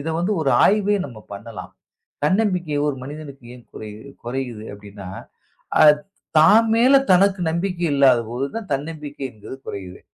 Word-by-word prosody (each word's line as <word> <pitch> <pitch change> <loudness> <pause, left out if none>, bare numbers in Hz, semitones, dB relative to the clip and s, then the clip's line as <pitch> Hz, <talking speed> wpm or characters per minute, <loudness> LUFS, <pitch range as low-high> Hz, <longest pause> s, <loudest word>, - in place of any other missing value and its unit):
இத 150 - -5
வந்து 180 +5 0
ஒரு 140 -4 +1
ஆய்வே 205 0 +3
நம்ம 120 -5 -9
பண்ணலாம். 100 -1 -9 0.5
தன்னம்பிக்கை 180 -3 +1
ஒரு 140 - -1
மனிதனுக்கு 145 -1 -9
ஏன் 125 - -14
குறையு 110 0 -9 0.2
குறையுது 120 -3 -5
அப்படின்னா, 100 -1 -11 0.8
அது 150 -1 +7 0.4
தான் 205 +8 +6
மேல 245 +4 +5 0.2
தனக்கு 195 +1 +3
நம்பிக்கை 175 +1 -2
இல்லாதபோதுதான் 135 - +1
தன்னம்பிக்கை 145 0 -5
என்பது 110 +3 -10
குறையுது. 95 -2 -7
145 Hz, 130 wpm, -21 LUFS, 120-180 Hz, 0.8 s, அது